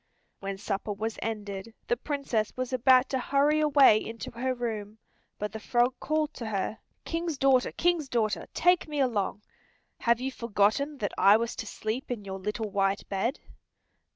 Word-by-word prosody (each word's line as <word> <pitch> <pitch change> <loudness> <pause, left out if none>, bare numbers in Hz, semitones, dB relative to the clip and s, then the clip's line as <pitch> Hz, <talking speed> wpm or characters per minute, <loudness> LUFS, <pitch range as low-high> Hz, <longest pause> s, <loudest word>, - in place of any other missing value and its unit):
When 195 0 -4
supper 200 0 -3
was 220 +3 -4
ended 210 -1 -5
the - - +2
Princess 255 -5 -2
was 255 0 -3
about 255 +1 +5
to 265 - 0
hurry 285 +4 +2
away 275 -8 +5
to 230 - -7
her 255 +2 -2
room, 220 -3 -4 0.4
but 210 0 -3
the 220 - -6
frog 240 +3 +2
called 310 0 0
to 235 - -6
her, 215 +1 -2 0.3
"King's 330 -2 -2
daughter, 265 -2 +3
King's 335 -5 +1
daughter, 215 -8 0
take 355 -1 +3
me 300 -1 -3
along. 210 -6 0 0.6
Have 235 0 +2
you 265 +1 -2
forgotten 235 +5 +1
that 205 -5 -3
I 200 +2 +7
was 230 +1 -3
to 225 - -5
sleep 220 +8 -4
in 225 -5 -4
your 190 0 -5
little 210 +2 -3
white 195 0 0
bed?" 215 +8 -1
235 Hz, 170 wpm, -28 LUFS, 210-270 Hz, 0.6 s, I